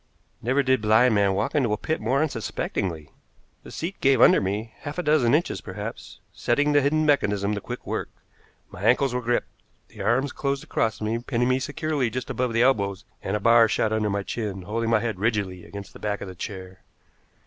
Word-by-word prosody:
Never 130 +4 +1
did 130 -2 +2
blind 110 +3 +4
man 100 -2 +2
walk 100 +3 -1
into 125 -8 +2
a - - 0
pit 160 +8 -2
more 130 +7 +2
unsuspectingly. 95 - -3 0.5
The - - -12
seat 175 +4 -5
gave 135 -2 +4
under - - +6
me, 105 +4 -3
half 145 +2 -7
a 180 - -1
dozen 150 -5 +3
inches, 165 - -1
perhaps, - - -7
setting 145 +5 +1
the 145 0 +4
hidden 155 +3 +2
mechanism 105 -8 +2
to 100 - -3
quick - - -7
work. - - -3 0.6
My 85 - -10
ankles 125 +4 +3
were 125 - -1
gripped, 120 0 0 0.4
the 105 - -10
arms 120 +7 +1
closed 140 -1 -2
across 110 -1 -1
me, 110 +2 -1
pinning 120 0 0
me 130 0 +2
securely 145 -2 -1
just 130 +2 -4
above 125 -1 -1
the 115 +1 +3
elbows, 100 -7 +1 0.2
and 95 - -2
a - - 0
bar 115 +2 +6
shot 110 0 0
under 110 -1 0
my 100 0 -1
chin, 100 -4 -4
holding 115 +4 -2
my 115 -2 +3
head 110 -5 -3
rigidly 100 -5 -1
against 100 -2 -9
the - - -12
back 105 -1 -2
of - - -7
the 95 - -7
chair. 95 0 -8
115 Hz, 205 wpm, -25 LUFS, 100-130 Hz, 0.6 s, under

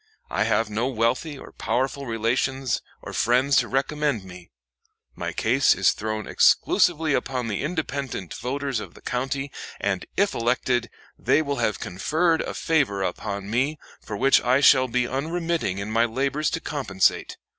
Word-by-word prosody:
I - - +1
have 115 +1 +2
no 110 +4 -1
wealthy 130 +5 0
or - - -11
powerful 130 +4 -2
relations 125 +3 0 0.2
or - - -7
friends 130 +4 +2
to 120 - +3
recommend 140 -3 0
me. 90 -2 -12 0.6
My - - -4
case - - +3
is - - +4
thrown 110 0 -4
exclusively 160 -3 +3
upon 130 -3 -1
the 105 -3 -2
independent 140 - -3
voters 135 0 -3
of - - -9
the - - -15
county; 135 +3 -3 0.3
and, 100 -2 -2
if 200 0 +2
elected, 120 0 0 0.3
they 155 - +3
will 140 -1 -2
have 105 - 0
conferred 160 - 0
a - - -5
favor 140 -12 +1
upon 100 +1 -4
me, 135 +7 +1 0.2
for 105 - -6
which 135 +4 +4
I 125 +2 +3
shall 130 -2 +6
be 125 0 0
unremitting 160 - -2
in 100 +2 -4
my 115 +1 +3
labors 135 +6 0
to - - -2
compensate. 130 -13 0
130 Hz, 155 wpm, -24 LUFS, 115-140 Hz, 0.6 s, shall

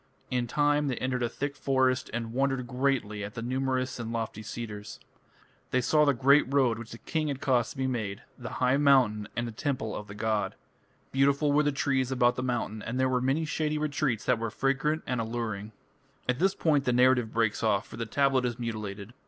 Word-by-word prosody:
In 125 -1 0
time 145 +3 +2
they 130 - 0
entered 130 0 -2
a 120 - +1
thick 140 +3 -4
forest, 130 -2 +1
and 115 0 -4
wondered 135 -1 0
greatly 125 -5 -1
at 100 +2 -7
the 115 - -4
numerous 130 0 -1
and 115 -1 -4
lofty 115 -2 -3
cedars. 105 -1 -7 0.7
They 130 - +2
saw 150 +5 +3
the 140 - +4
great 135 +2 +4
road 130 -5 +3
which 115 -1 -8
the 115 - -7
king 155 +5 -2
had 140 -2 -2
caused 125 -5 +2
to - - -10
be 130 - 0
made, 110 -6 -3
the 125 0 -7
high 130 +1 +2
mountain, 125 -8 +3
and 120 0 -1
the - - -5
temple 120 -2 -2
of 105 - -6
the 100 - -9
god. 105 -2 -1 0.6
Beautiful 140 +2 +3
were 145 +1 +4
the 145 -1 +2
trees 135 -2 0
about 125 -1 +3
the - - -3
mountain, 120 -4 -2
and 120 +5 -3
there 130 - +3
were 125 -1 +1
many 135 +5 +1
shady 155 0 -1
retreats 145 -6 -1
that 125 -3 +2
were 115 0 -2
fragrant 135 +7 0
and 125 -2 -1
alluring. 110 -2 -4 0.6
At 125 +1 +1
this 190 +1 +2
point 145 -4 +2
the 125 - +2
narrative 125 -2 +4
breaks 110 -3 +1
off, 105 -3 +2
for - - -11
the 115 0 -3
tablet 135 0 +2
is 120 -1 -2
mutilated. 110 -2 -5
125 Hz, 210 wpm, -29 LUFS, 115-135 Hz, 0.7 s, the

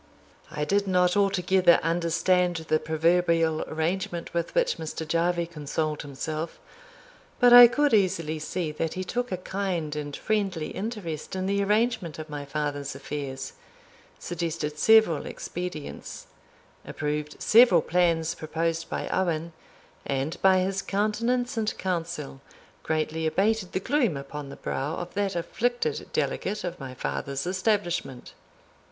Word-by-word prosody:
I 150 0 -3
did 200 +3 +1
not 180 -1 +3
altogether 190 -3 +4
understand 175 +2 +2
the 155 - +3
proverbial 165 0 +2
arrangement 170 +2 -2
with 170 - -2
which - - +2
Mr. 160 0 -5
Jarvie 170 +2 +1
consoled 155 -1 -3
himself, 155 +3 -5 0.8
but 245 -1 +7
I 245 0 +12
could 290 +3 +1
easily 165 -6 +1
see 160 +1 -3
that 160 +1 -3
he 185 - -2
took 245 +6 -3
a 185 - -1
kind 180 -5 -3
and 145 -1 -4
friendly 195 -7 -1
interest 190 -8 -5
in 185 0 -2
the 200 +1 +1
arrangement 210 -4 0
of 155 -1 -8
my 145 -1 -5
father's 145 -1 -3
affairs, 135 -1 -5 0.6
suggested 165 -3 -4
several 220 -9 +5
expedients, 175 -4 -6 0.6
approved 150 0 -4
several 220 -7 +6
plans 165 -2 +2
proposed 165 +1 -2
by - - -3
Owen, 170 -3 -1 0.5
and 140 +4 -3
by 190 -1 +5
his 195 +1 -1
countenance 230 +5 0
and 220 -1 -1
counsel 165 -7 -3 0.4
greatly 160 0 -1
abated 195 +4 +1
the - - +1
gloom 235 - +1
upon 140 +1 -7
the - - -8
brow 145 +4 -3
of 175 - -6
that 200 -2 -1
afflicted 245 - -1
delegate 210 +2 -1
of 180 0 -5
my 130 -2 -7
father's 135 +2 -3
establishment. 185 - -1
170 Hz, 135 wpm, -26 LUFS, 155-195 Hz, 0.8 s, I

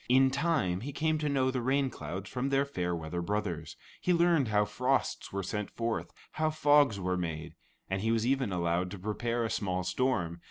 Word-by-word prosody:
In 130 +1 +5
time 135 - +1
he 140 +5 -4
came 155 +2 0
to 150 -1 0
know 130 -2 +2
the 130 -1 -1
rain 135 +2 +1
clouds 90 +6 -6
from 130 +4 -2
their 140 0 +2
fair 90 -10 -2
weather 80 +1 -4
brothers; 90 -4 -3 0.2
he 180 - +1
learned 170 -5 +4
how 105 -1 +3
frosts 125 +6 -1
were 100 0 -2
sent 105 +3 -3
forth; 115 -1 -3 0.2
how 155 0 0
fogs 145 -7 +4
were 90 0 0
made; 80 -2 -4 0.3
and 95 0 -2
he 110 - 0
was 115 0 +2
even 130 -4 +1
allowed 85 0 0
to 100 - -7
prepare 115 +5 -1
a - - -1
small 90 -2 -1
storm. 90 -8 0
110 Hz, 200 wpm, -31 LUFS, 90-135 Hz, 0.3 s, In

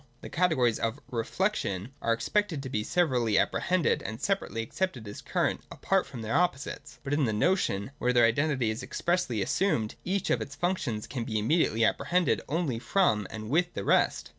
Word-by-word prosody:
The - - -8
categories 160 -10 +2
of 115 +5 -1
'reflection' 115 - -1
are 115 - +1
expected 160 - 0
to 130 - -5
be 105 -4 -1
severally 125 - +2
apprehended 180 -3 +1
and 110 +1 -6
separately 190 - -1
accepted 125 - -3
as 100 - -8
current, - - 0
apart 195 -1 0
from 120 -5 -7
their 110 +1 -3
opposites. 150 -3 -1
But 140 - -2
in 145 -1 +2
the 110 - 0
notion, 105 - +1
where 125 - +2
their 120 -2 +5
identity 130 -1 +1
is 110 - -5
expressly 175 - -1
assumed, 115 - 0
each 190 +1 -1
of 120 - +2
its 135 +6 -6
functions 145 - -1
can 125 -4 -4
be 110 -1 -2
immediately 115 -1 +2
apprehended 175 +6 +1
only 150 -6 -1
from 115 - +2
and 110 0 -7
with 175 +3 +1
the 100 - -3
rest. - - +2
130 Hz, 180 wpm, -29 LUFS, 110-175 Hz, -, their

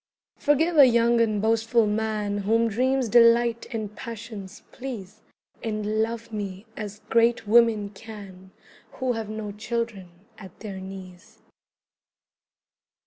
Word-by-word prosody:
Forgive 315 +3 +2
a 280 -3 +9
young 235 0 +3
and 215 -2 +1
boastful 225 +1 +3
man 210 -1 -1
Whom 225 +3 +2
dreams 255 +3 +1
delight 235 0 +4
and 215 -3 -4
passions 220 -4 -8
please, 220 -6 -8 0.4
And 215 -1 -1
love 230 0 -3
me 200 -1 -5
as 210 0 -7
great 230 -1 +3
women 220 -2 +4
can 195 -3 -11 0.4
Who 260 -1 -1
have 225 -2 -4
no 215 -1 -5
children 220 -3 -4 0.3
at 190 -4 -13
their 200 -3 -6
knees. 190 -1 -11
220 Hz, 120 wpm, -25 LUFS, 205-235 Hz, 0.4 s, a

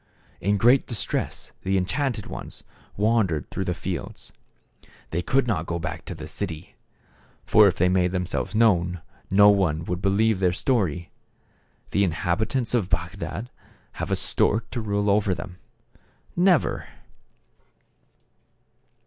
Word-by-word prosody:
In 100 +2 +1
great 120 +6 +4
dis 115 -4 +1
tress - - -3
the 95 +1 0
enchanted 115 +4 -1
ones - - -8 0.3
wandered 100 -8 +1
through - - -3
the - - -1
fields. - - -6 0.8
They 85 - -1
could 135 +9 +1
not 90 -9 -1
go 85 - -2
back 85 -1 -5
to 90 - -6
the 80 -1 -8
city. 80 0 -6 0.7
For 105 -1 +6
if 90 - +1
they 90 - +2
made 90 -1 +2
themselves 90 +3 -2
known, 90 -6 +3 0.3
no 100 +2 +7
one 85 -5 +1
would 90 +1 -3
believe 100 +1 +2
their 90 -2 +2
story. 90 - 0 0.8
The 100 - +2
inhabitants 100 - -1
of 110 -7 +1
Bagdad 120 +5 -3 0.4
have - - -5
a - - +2
stork 110 +2 +1
to 120 - -3
rule 105 -1 -1
over 100 -2 +2
them? 90 -1 -9 0.8
Never 180 -1 +2
100 Hz, 135 wpm, -25 LUFS, 90-110 Hz, 0.8 s, no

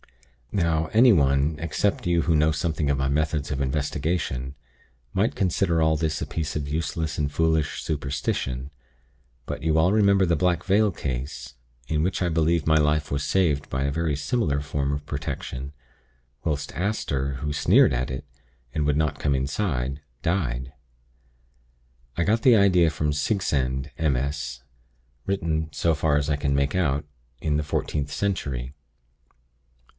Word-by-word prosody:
"Now, 80 -4 +1
anyone, 75 - +4
except 85 +4 -1
you 85 -2 +2
who 80 0 +2
know 75 +1 +4
something 80 -1 -1
of 70 - +2
my 65 0 0
methods 75 +1 0
of 70 -1 -2
investigation, 70 -1 -2 0.6
might 105 +5 +1
consider 85 -3 +1
all 80 0 +3
this 80 -1 -1
a - - -1
piece 80 -2 -3
of 75 -2 -2
useless 80 +1 -2
and 70 -1 0
foolish 80 -2 +1
superstition; 70 -2 -2 0.7
but - - -5
you 80 0 +1
all 90 +5 +4
remember 100 -2 +4
the 85 -1 +2
Black 90 +1 +1
Veil 105 +2 +3
case, 65 -3 -5 0.3
in 75 -1 0
which 95 +2 -1
I 90 - +2
believe 80 -1 +1
my 80 - +4
life 75 0 +2
was 70 0 -1
saved 75 -3 +1
by 65 +1 -1
a 70 - 0
very 80 0 0
similar 75 - 0
form 70 -1 -2
of 70 0 -3
protection, 65 -1 -5 0.7
whilst 75 -3 -2
Aster, 70 -9 -1
who 75 +3 -3
sneered 70 - +4
at 65 +1 -1
it, 65 +2 -5 0.5
and 75 -2 0
would 75 0 +2
not 75 0 0
come 70 -1 +1
inside, 70 -1 -1 0.2
died. 65 -7 -1 1.4
I 85 - +2
got 110 +5 +2
the 125 -1 +6
idea 90 -4 +5
from 75 -1 -1
the - - -1
Sigsand 70 - -1
MS., 70 -3 -1 0.6
written, 80 -5 -1
so 85 +2 +1
far 75 -1 +2
as 75 -1 0
I 75 - +2
can 70 -1 0
make 70 +2 +1
out, 75 -6 +1 0.3
in 75 -2 0
the 75 - 0
14th 75 0 -2
century. 70 -9 -2
75 Hz, 155 wpm, -25 LUFS, 70-85 Hz, 1.4 s, the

